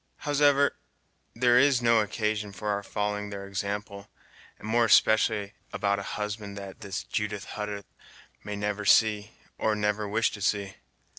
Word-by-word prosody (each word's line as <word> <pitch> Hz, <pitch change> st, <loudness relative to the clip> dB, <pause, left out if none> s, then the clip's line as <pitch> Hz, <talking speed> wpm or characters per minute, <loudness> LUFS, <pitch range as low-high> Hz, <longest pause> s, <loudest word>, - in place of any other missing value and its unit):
Howsoever, 145 Hz, -1 st, +3 dB, 0.6 s
there 120 Hz, +1 st, +5 dB
is 140 Hz, -2 st, +4 dB
no 115 Hz, -1 st, +4 dB
occasion 105 Hz, -1 st, -1 dB
for 100 Hz, +2 st, -4 dB
our 100 Hz, 0 st, 0 dB
following 105 Hz, 0 st, -3 dB
their 100 Hz, -1 st, -6 dB
example, 100 Hz, +1 st, -5 dB, 0.5 s
and -, -, -10 dB
more 115 Hz, +1 st, +3 dB
especially 110 Hz, -2 st, +3 dB, 0.2 s
about 100 Hz, -1 st, 0 dB
a 100 Hz, -, -5 dB
husband 105 Hz, -1 st, -4 dB
that 100 Hz, +1 st, -9 dB
this 100 Hz, -2 st, -4 dB
Judith 105 Hz, -2 st, -3 dB
Hutter 105 Hz, -1 st, -5 dB, 0.6 s
may 105 Hz, -, -5 dB
never 105 Hz, 0 st, -2 dB
see, 105 Hz, +1 st, +4 dB, 0.3 s
or 110 Hz, -1 st, +1 dB
never 105 Hz, 0 st, -1 dB
wish 110 Hz, +2 st, +1 dB
to 105 Hz, -, -8 dB
see. 100 Hz, -1 st, 0 dB
105 Hz, 150 wpm, -27 LUFS, 100-110 Hz, 0.6 s, there